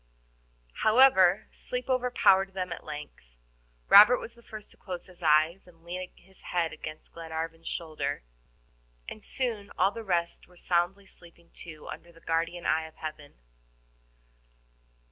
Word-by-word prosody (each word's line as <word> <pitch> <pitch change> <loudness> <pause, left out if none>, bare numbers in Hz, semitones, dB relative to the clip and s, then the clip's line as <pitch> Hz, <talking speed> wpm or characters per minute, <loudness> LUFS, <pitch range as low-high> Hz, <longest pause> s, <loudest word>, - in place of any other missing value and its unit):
However, 215 -5 +5
sleep 250 0 -5
overpowered 245 -7 +3
them 185 -2 -2
at - - -10
length. 150 - -9 0.5
Robert 215 +5 +9
was 230 - -8
the 235 - -19
first 215 -2 -10
to - - -17
close 180 -3 -7
his 180 -1 -17
eyes 160 +4 +3
and 165 -2 -20
lean 180 +1 -6
his 190 +1 -23
head 170 -2 -1
against 155 0 -9
Glenarvan's 165 0 -6
shoulder, 155 -4 -3 0.8
and 215 - -9
soon 225 -6 -3
all 190 +2 +4
the 230 - -7
rest 170 -4 -1
were 180 - -21
soundly 175 +3 0
sleeping 170 -2 -16
too 155 -3 -11
under 170 - -9
the 165 - -19
guardian 165 +1 -2
eye 160 0 +1
of 160 - -17
Heaven. 155 -2 -8
175 Hz, 145 wpm, -28 LUFS, 165-200 Hz, 0.8 s, Robert